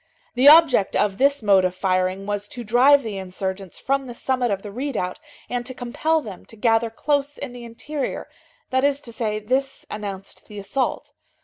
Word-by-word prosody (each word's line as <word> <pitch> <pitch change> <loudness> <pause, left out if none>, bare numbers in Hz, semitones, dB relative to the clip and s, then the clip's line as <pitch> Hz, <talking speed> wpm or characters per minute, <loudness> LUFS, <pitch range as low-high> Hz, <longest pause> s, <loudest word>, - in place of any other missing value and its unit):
The 255 +3 +7
object 290 -10 +6
of 200 -2 +1
this 280 -1 +3
mode 195 -2 +5
of 185 0 0
firing 185 +1 0
was 205 0 -3
to 240 +3 -7
drive 260 +6 +5
the 210 -4 -4
insurgents 190 0 -5
from 275 0 -1
the 240 - -8
summit 255 -1 0
of 195 -1 -2
the 205 - -7
redoubt, 230 -6 -3 0.3
and 245 -1 -3
to 255 - -6
compel 310 +7 0
them 205 -8 -9
to - - -12
gather 225 +1 +2
close 285 +4 -1
in 275 -3 -6
the 245 -1 -9
interior, 260 +5 -5 0.4
that 260 0 +2
is 285 0 +2
to 235 - -8
say, 220 -3 -2
this 260 +6 -2
announced 200 -2 -7
the 210 - -11
assault. 255 +7 -2
235 Hz, 190 wpm, -23 LUFS, 200-270 Hz, 0.4 s, The